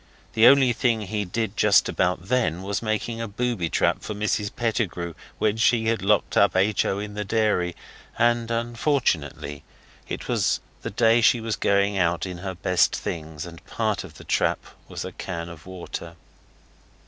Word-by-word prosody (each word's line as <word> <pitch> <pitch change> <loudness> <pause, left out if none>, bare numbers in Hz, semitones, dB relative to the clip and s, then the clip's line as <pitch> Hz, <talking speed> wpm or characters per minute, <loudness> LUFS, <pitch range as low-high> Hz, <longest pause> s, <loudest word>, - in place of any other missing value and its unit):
The 115 +1 +6
only 135 -3 +6
thing 115 -2 +1
he 105 0 -3
did 110 +3 -2
just 105 -2 +4
about 90 -1 0
then 110 -9 +1
was 100 +1 -2
making 115 +1 -2
a 115 - -3
booby 110 -5 -2
trap - - +1
for 105 - -5
Mrs 105 0 0
Pettigrew 100 -7 -1 0.2
when 110 0 +1
she 115 0 +3
had 115 - 0
locked 100 +1 +2
H. 100 +1 +3
O. 95 - 0
up 100 - -3
in 105 - -10
the 105 0 -3
dairy, 100 -5 +1 0.4
and 120 0 +2
unfortunately 115 - -1 0.5
it - - -5
was - - +1 0.2
the - - -4
day 115 +1 +4
she 120 - +5
was 115 -1 -2
going 100 0 +2
out 85 -1 +1
in 90 -2 -6
her 95 0 -5
best 90 0 +2
things, 80 -1 -5
and 85 -1 -11
part - - -1
of - - -12
the - - -12
trap - - 0 0.2
was - - -5
a - - -6
can 85 -2 -5
of 85 -1 -12
water. 85 -2 -7
105 Hz, 175 wpm, -24 LUFS, 90-115 Hz, 0.5 s, The